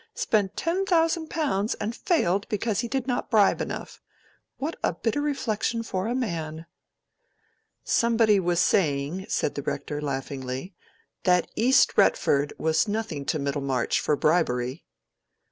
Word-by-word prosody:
—spent 215 - 0
ten 345 +4 0
thousand 330 -3 +1
pounds 235 -10 0
and 220 +3 -4
failed 205 - +1
because 210 0 -1
he 235 - -1
did 265 +1 -2
not 250 -2 -2
bribe 210 -3 +4
enough. - - -6 0.6
What 305 +5 -3
a - - +1
bitter 225 +9 -1
reflection 235 -5 -1
for 190 -2 -3
a 240 - -1
man!" 165 -9 -3 1.2
"Somebody 225 -3 +3
was 175 -2 +1
saying," 165 0 +1
said - - 0
the 145 - -4
Rector, 145 +1 -4
laughingly, 135 +3 -4 0.5
"that 180 -1 +3
East 255 +4 +4
Retford 145 - +3
was 160 +6 +1
nothing 205 -9 -3
to 155 - 0
Middlemarch, 140 -3 -1
for 150 - +1
bribery." 135 -4 0
195 Hz, 135 wpm, -26 LUFS, 150-235 Hz, 1.2 s, bribe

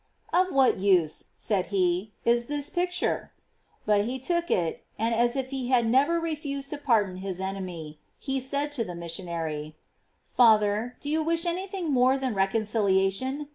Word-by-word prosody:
" - - -29
Of 370 +1 +3
what 270 -2 +4
use," 185 -5 +2
said 200 -4 -1
he, 185 +1 0
" - - -37
is 235 0 +2
this 290 -1 -2
picture?" 360 0 -1 0.5
But 210 -1 +3
he 250 +3 -2
took 340 +6 -1
it, 165 -3 0
and 225 +1 0
as 240 +2 +2
if 265 -1 -2
he 265 -2 -3
had 245 -2 +3
never 275 +9 +3
refused 290 -4 -4
to 300 - -4
pardon 210 -9 +1
his 185 -1 -5
enemy, 180 -6 -5 0.2
he 270 -1 -2
said 280 +3 -2
to 265 -5 0
the 180 -5 -7
missionary, 165 -3 -5 0.3
" - - -45
Father, 220 0 +3
do - - -8
you 310 +2 +1
wish 330 +2 +1
anything 365 -1 -2
more 255 +1 +4
than 260 -3 -2
reconciliation? 205 +6 +1
235 Hz, 175 wpm, -27 LUFS, 195-285 Hz, 0.5 s, what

